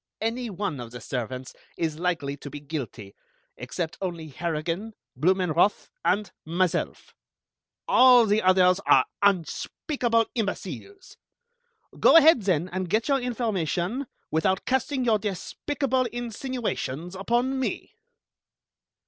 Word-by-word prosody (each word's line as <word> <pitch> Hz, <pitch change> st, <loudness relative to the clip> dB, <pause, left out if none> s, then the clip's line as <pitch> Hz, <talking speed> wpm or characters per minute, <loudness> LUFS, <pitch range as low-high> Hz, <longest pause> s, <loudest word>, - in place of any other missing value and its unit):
Any 230 Hz, +2 st, -2 dB
one 190 Hz, -7 st, -3 dB
of 120 Hz, -1 st, -7 dB
the 120 Hz, +1 st, -9 dB
servants 125 Hz, +2 st, -5 dB, 0.2 s
is 160 Hz, -2 st, -2 dB
likely 160 Hz, -6 st, -1 dB
to 145 Hz, -, -9 dB
be 145 Hz, -, -7 dB
guilty, 135 Hz, -9 st, -6 dB, 0.4 s
except 160 Hz, +7 st, -5 dB
only 170 Hz, -4 st, -4 dB
Harrigan, 170 Hz, +7 st, -3 dB, 0.2 s
Blumenroth, 180 Hz, +5 st, +2 dB
and 210 Hz, 0 st, +1 dB
myself. 175 Hz, +2 st, -1 dB, 0.7 s
All 250 Hz, -2 st, +7 dB
the 210 Hz, +1 st, +2 dB
others 185 Hz, 0 st, +4 dB
are -, -, +6 dB, 0.2 s
unspeakable 230 Hz, -, +1 dB
imbeciles! 235 Hz, -, -5 dB, 0.8 s
Go -, -, +7 dB
ahead, 320 Hz, -5 st, +7 dB
then, 180 Hz, -4 st, +1 dB
and 185 Hz, -1 st, -3 dB
get 220 Hz, -, +1 dB
your 275 Hz, -1 st, +3 dB
information, 230 Hz, -, -2 dB, 0.2 s
without 185 Hz, +4 st, +1 dB
casting 265 Hz, 0 st, 0 dB
your 220 Hz, -3 st, +3 dB
despicable 255 Hz, +6 st, -2 dB
insinuations 235 Hz, -, -4 dB
upon 240 Hz, +7 st, 0 dB
me." 260 Hz, -, -3 dB
190 Hz, 115 wpm, -26 LUFS, 160-240 Hz, 0.8 s, All